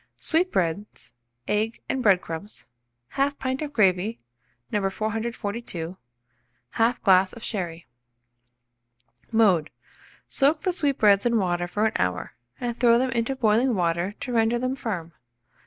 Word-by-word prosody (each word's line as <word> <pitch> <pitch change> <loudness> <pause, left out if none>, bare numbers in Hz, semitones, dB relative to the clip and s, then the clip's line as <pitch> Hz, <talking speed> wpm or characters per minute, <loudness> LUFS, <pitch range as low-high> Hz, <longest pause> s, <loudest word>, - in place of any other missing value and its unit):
Sweetbreads, 205 - -1 0.3
egg 215 +2 0
and 265 - -1
bread 195 -6 +4
crumbs, 165 +6 -6 0.5
1/2 280 +1 +1
pint 260 +1 -2
of 300 -2 -4
gravy, 205 -2 +2 0.5
No. 210 - +1
442, 215 -4 -4 0.8
1/2 230 +2 +1
glass 190 -2 +5
of 230 - -10
sherry. 175 -5 -4 1.5
Mode. 195 -9 +3 0.6
Soak 295 +2 +2
the 370 - 0
sweetbreads 240 - +3
in 235 -1 +2
water 175 -3 0
for 210 +4 0
an 220 - +1
hour, 90 0 -1 0.3
and 240 -1 -3
throw 235 -1 +5
them 255 +1 0
into 235 +3 -1
boiling 235 +1 +2
water 175 +1 0
to 250 - -4
render 225 +1 +3
them 255 +2 -1
firm. 180 -10 -4
220 Hz, 130 wpm, -25 LUFS, 185-245 Hz, 1.5 s, glass